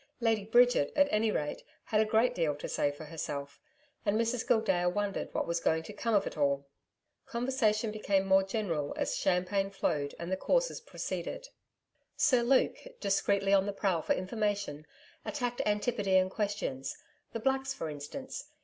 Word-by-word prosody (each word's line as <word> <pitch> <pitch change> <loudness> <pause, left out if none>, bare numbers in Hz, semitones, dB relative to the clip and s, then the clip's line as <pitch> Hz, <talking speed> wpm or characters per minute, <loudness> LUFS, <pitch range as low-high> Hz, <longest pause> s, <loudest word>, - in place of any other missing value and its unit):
Lady 225 -3 +2
Bridget, 240 -8 +4
at 285 0 +5
any 215 +1 +2
rate, 150 -8 -2 0.2
had 215 0 +2
a - - +3
great 225 +3 +3
deal 160 -4 0
to 145 - -6
say 145 - +1
for 145 +2 -8
herself, 140 -3 -5 0.4
and 210 +1 +1
Mrs 230 +1 0
Gildea 180 -5 +3
wondered 200 +2 -2
what - - -1
was 170 0 -1
going 160 -1 +1
to 210 - -9
come 225 +2 0
of 200 - +3
it - - -5
all. 140 -2 +1 0.6
Conversation 235 -4 +1
became 200 -2 +1
more 190 0 +5
general 190 -7 -2
as - - 0
champagne 190 +2 +1
flowed 145 -7 -1
and 170 +2 -5
the 190 - +1
courses - - +1
proceeded. - - -5 0.7
Sir 255 -5 +4
Luke, 255 +2 +3 0.2
discreetly 195 0 +2
on 195 0 +4
the 205 - -2
prowl 190 -5 0
for - - +1
information, 200 -6 -2 0.4
attacked 245 -4 -2
Antipodean 205 -3 +2
questions 205 -11 -3 0.4
the 230 - -2
Blacks 265 +3 0
for 165 - -4
instance. 155 - -7
200 Hz, 165 wpm, -31 LUFS, 170-230 Hz, 0.7 s, at